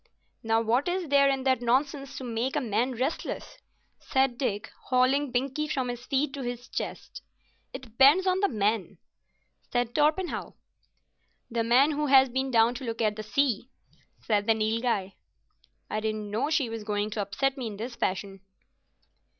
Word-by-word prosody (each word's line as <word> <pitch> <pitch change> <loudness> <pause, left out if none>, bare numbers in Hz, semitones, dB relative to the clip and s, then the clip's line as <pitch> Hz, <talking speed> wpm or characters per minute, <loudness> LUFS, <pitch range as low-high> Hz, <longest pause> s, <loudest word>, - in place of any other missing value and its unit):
"Now 225 0 +2
what 235 +6 +1
is 355 -2 -2
there 280 0 +5
in 270 -1 0
that 260 -2 +2
nonsense 275 +3 0
to - - -6
make 240 +3 -2
a - - +2
man 245 +1 0
restless?" 255 +6 -4 0.4
said 265 -2 +1
Dick, 210 -7 -2
hauling 260 +3 +2
Binkie 270 +5 -1
from 260 -4 -1
his 245 +1 -6
feet 275 0 0
to 280 - -5
his 245 -1 -5
chest. - - -6 0.5
"It - - -8
depends 270 - +5
on 370 0 +2
the 400 - +2
man," 210 -3 -1 0.7
said 245 -1 0
Torpenhow. 310 +5 0 1.0
"The 230 0 0
man 255 +6 +4
who 300 0 -1
has 265 -1 +6
been 265 +2 -1
down 230 -1 +4
to 275 - -9
look 230 -2 -4
at 215 -2 +1
the 215 - -5
sea," 245 +1 0 0.5
said 210 -2 0
the 225 - +4
Nilghai. 220 -3 -1 0.7
"I 215 - -2
didn't 215 -1 -3
know 225 +7 0
she 310 -5 +1
was 225 -1 -6
going 210 0 -2
to 210 - -2
upset 270 +7 -1
me 255 -4 -4
in 205 -2 -7
this 235 +4 -5
fashion." 195 -1 -3
245 Hz, 170 wpm, -27 LUFS, 225-275 Hz, 1.0 s, has